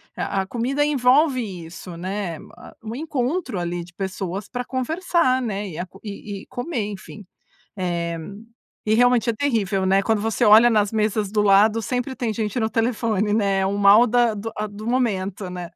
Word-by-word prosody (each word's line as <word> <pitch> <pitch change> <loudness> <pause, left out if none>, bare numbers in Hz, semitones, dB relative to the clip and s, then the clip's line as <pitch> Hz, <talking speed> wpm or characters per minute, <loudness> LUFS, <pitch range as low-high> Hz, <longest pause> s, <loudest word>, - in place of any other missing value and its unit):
a 195 - -1
a 190 - -4
comida 255 +7 -1
envolve 270 0 +3 0.2
isso, 170 +1 -9
né. 185 -2 -4 0.2
Ah - - -13
o 225 +1 -6
encontro 280 - -2
ali 175 0 -3
de 175 +1 -16
pessoas 190 +1 -4
pra 250 0 -4
conversar, 260 +1 0
né. 205 -3 -3
E 160 - -8
a 180 - -3
co 195 - -17
e 205 -1 -7
e - - -16
comer, 245 -4 -3
enfim. 200 +1 -10 0.5
Eh, 170 -2 -2 0.7
e 215 - +3
realmente 245 0 +3
é - - 0
terrível, 215 -7 0
né. 195 +1 +3
Quando 220 0 +1
você 225 +2 0
olha 220 +3 +8
nas 210 -1 +2
mesas 215 -2 0
do 210 - +2
lado 210 +3 +4
sempre 250 +4 -2
tem 235 -4 -2
gente 215 +1 -2
no 220 - +1
telefone, 220 -3 0
né. 200 -3 +1
O 200 +1 -1
mal 205 +4 +7
da 240 -1 +2
do 210 +2 -5
a 215 0 -2
do 210 +1 -9
momento, 200 -6 -1
né. 180 -1 -6
215 Hz, 185 wpm, -22 LUFS, 195-245 Hz, 0.7 s, olha